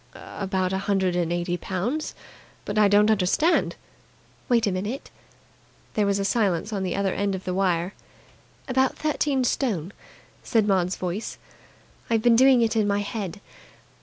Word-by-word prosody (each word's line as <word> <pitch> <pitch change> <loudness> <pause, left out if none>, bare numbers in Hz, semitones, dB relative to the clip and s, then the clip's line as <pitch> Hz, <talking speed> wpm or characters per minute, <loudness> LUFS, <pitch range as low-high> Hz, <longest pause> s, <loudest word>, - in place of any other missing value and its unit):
"About 190 -2 -3
a 190 - 0
hundred 195 -2 0
and 170 -1 0
eighty 175 0 -1
pounds. 215 - -3 0.5
But 205 +1 -1
I 210 - +6
don't 205 +2 +5
understand." 215 - +2 0.7
"Wait 235 -2 +3
a 200 - +1
minute." 205 +9 -4 0.8
There 210 -2 +1
was 200 0 +2
a 200 - -1
silence 205 -2 0
at 200 - -2
the 185 -2 -2
other 195 -1 0
end 200 -1 -1
of 190 - -7
the 185 - -3
wire. 180 -1 0 0.7
"About 260 0 +1
thirteen 290 -3 0
stone," 205 - -1 0.5
said 220 -3 +1
Maud's 185 -2 +1
voice. 185 +4 -4 0.7
"I've 225 -1 +1
been 240 -1 +5
doing 255 0 +6
it 225 -1 0
in 215 -2 +2
my 200 0 +1
head. 200 -2 -5
200 Hz, 160 wpm, -25 LUFS, 185-225 Hz, 0.8 s, I